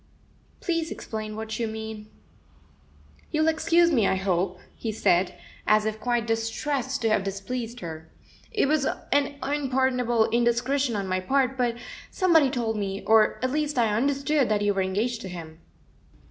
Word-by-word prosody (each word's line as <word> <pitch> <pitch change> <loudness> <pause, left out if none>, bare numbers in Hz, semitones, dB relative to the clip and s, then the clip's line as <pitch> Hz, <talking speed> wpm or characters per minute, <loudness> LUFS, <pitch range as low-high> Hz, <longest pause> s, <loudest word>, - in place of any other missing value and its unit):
"Please 330 -2 -1
explain 215 -1 -5
what 220 +1 -5
you 230 - 0
mean. 220 -1 -7 1.2
"You'll 310 +1 +1
excuse 335 +2 +3
me, 230 -9 +3
I - - +2
hope," 185 -1 0 0.2
he 225 - -3
said, 185 -4 +1 0.3
as 215 0 +4
if 220 0 -2
quite 240 0 0
distressed 250 +3 -2
to 225 - +3
have 215 -2 +2
displeased 230 +5 -4
her. 160 -2 -7 0.4
"It 425 - +2
was 295 -2 +2 0.3
an 285 0 +2
unpardonable 260 -4 +1
indiscretion 240 +2 +1
on 200 -1 -2
my 185 0 0
part, 265 +6 +1
but 245 -2 0 0.3
somebody 330 -7 +4
told 235 -4 -1
me, 195 -1 -3
or 220 -1 +4
at 255 - +1
least 300 -1 -1
I 225 -3 +2
understood, 275 +2 +1
that 210 -1 +1
you 205 0 +2
were 195 - 0
engaged 215 +6 -1
to 190 - -6
him." 165 -2 -9
230 Hz, 160 wpm, -26 LUFS, 210-275 Hz, 1.2 s, as